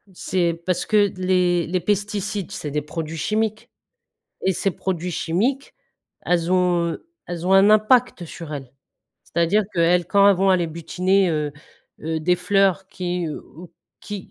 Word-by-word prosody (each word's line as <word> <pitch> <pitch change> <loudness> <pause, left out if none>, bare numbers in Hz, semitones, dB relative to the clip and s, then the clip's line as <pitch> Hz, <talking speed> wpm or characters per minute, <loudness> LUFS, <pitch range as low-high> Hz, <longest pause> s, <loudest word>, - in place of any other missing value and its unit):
C'est 175 -3 0
parce 180 -1 0
que 210 -1 +3
d 185 -1 -9
les 180 -2 +2
les 180 +2 -1
pesticides, 205 0 -2
c'est 150 - -5
des 150 +1 -2
produits 160 +1 -6
chimiques, 215 +6 -2 0.8
et 190 - +2
ces 195 +3 0
produits 180 -1 -3
chimiques, 225 +13 -1 0.5
elles 175 0 0
ont 175 -2 +1 0.3
elles 175 0 -5
ont 190 - +4
un 195 +2 +6
impact 215 -2 +3
sur 160 -1 -8
elles! 135 -3 -7 0.5
C'est-à-dire 170 +6 +1
qu'elles 175 0 +3
quand 200 +2 +4
elles 200 - +5
vont 195 +2 +2
aller 180 -2 +2
butiner, 180 +4 0
heu 150 -2 -2 0.5
heu, 160 0 -3
des 180 +3 +2
fleurs 195 0 +1
qui, 180 -3 -3
heu, 150 - -5
ou 170 +2 -14 0.3
qui 205 -3 -8
180 Hz, 160 wpm, -22 LUFS, 170-195 Hz, 0.8 s, un